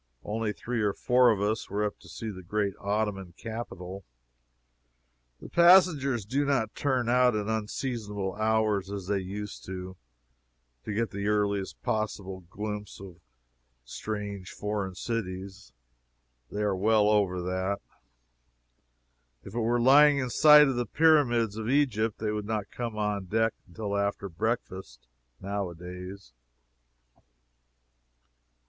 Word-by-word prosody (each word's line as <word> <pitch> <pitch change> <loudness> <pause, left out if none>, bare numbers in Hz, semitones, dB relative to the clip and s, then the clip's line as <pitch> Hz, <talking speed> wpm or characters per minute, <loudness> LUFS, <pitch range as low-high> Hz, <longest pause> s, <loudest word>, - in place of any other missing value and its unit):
Only 110 0 -2
three 120 +2 -3
or 105 -2 +1
four 125 0 +4
of 105 -3 +1
us 110 +2 -1
were 105 +2 -1
up 105 - -4
to 85 - -16
see 110 +7 -5
the 95 -2 -9
great 100 +2 -1
Ottoman 100 -3 -2
capital. 100 -5 -7 1.4
The - - -10
passengers 170 - +5
do 135 +7 0
not 135 -6 0
turn 130 -4 0
out 125 -1 +4
at 105 -1 -1
unseasonable 105 -2 -3
hours, 110 -2 +1
as 100 -2 -5
they 100 +1 0
used 100 +2 -6
to, 95 0 -7 0.9
to - - -4
get 115 +2 -1
the 100 +1 -3
earliest 100 -2 -1
possible 100 -3 -2
glimpse 105 0 -6
of 95 -3 -11 0.7
strange 100 - -5
foreign 105 -3 -3
cities. 95 - -5 0.8
They 105 +1 -3
are 100 -2 +1
well 105 +2 +3
over 100 -4 +2
that. 95 +2 -1 1.7
If 100 - -10
we 120 - -1
were 120 +2 +1
lying 145 +4 +7
in 130 -3 -2
sight 150 +3 +8
of 135 -2 -1
the 120 -2 -1
Pyramids 120 -8 +3
of 110 +1 -3
Egypt, 115 -6 +1
they 110 -1 -2
would 105 -1 -3
not 110 -2 -3
come 115 -3 -4
on 105 -2 -1
deck 110 +4 +1
until 100 +3 -4
after 100 0 -1
breakfast, 95 - -4 0.3
now 100 -1 -3
a 85 - -10
days. 90 -2 -9
105 Hz, 135 wpm, -28 LUFS, 100-115 Hz, 1.7 s, sight